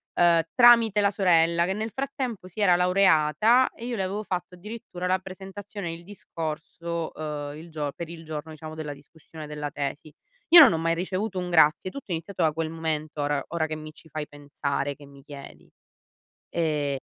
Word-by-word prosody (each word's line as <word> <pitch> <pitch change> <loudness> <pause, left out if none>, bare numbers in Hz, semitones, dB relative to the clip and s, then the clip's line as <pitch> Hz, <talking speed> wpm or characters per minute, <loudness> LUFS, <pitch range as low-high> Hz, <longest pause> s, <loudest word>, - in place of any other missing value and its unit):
uhm, 170 -1 +5
tramite 230 -4 +6
la 200 0 +3
sorella, 170 -3 +3
che 190 - -1
nel 220 +2 -4
frattempo 260 -7 -4
si 185 +4 -7
era 185 -4 +5
laureata 185 +6 +4
e 230 - -9
io 245 -1 -3
le 195 - 0
avevo 200 +3 -3
fatto 180 -2 -4
addirittura 185 -2 -6
la 185 +1 +2
presentazione, 190 0 -7
il 165 +1 -9
discorso, 170 -2 -5
uhm, 150 -2 -5
il 165 +2 -11
gio 150 -3 -3
per 170 - -6
il 165 -1 -9
giorno, 155 0 -6
diciamo, 155 0 -9
della 150 -2 -5
discussione 155 +2 -13
della 150 -1 -5
tesi. 145 +1 -5 0.4
Io 345 - +13
non 270 -10 +9
ho 165 - 0
mai 165 +1 +1
ricevuto 185 +3 -3
un 180 -1 -3
grazie, 160 +1 +4
tutto 280 - -8
è - - -8
iniziato 165 +2 -3
da 155 - +3
quel 160 0 -2
momento, 155 -2 -3
ora 145 -1 0
ora 165 -1 0
che 155 - -4
mi 155 0 -8
ci 165 - -17
fai 155 0 -4
pensare, 145 -1 -3
che 145 - -14
mi 140 0 -16
chiedi. 140 -1 -12 0.8
Ehm 150 -4 0
165 Hz, 195 wpm, -26 LUFS, 155-190 Hz, 0.8 s, Io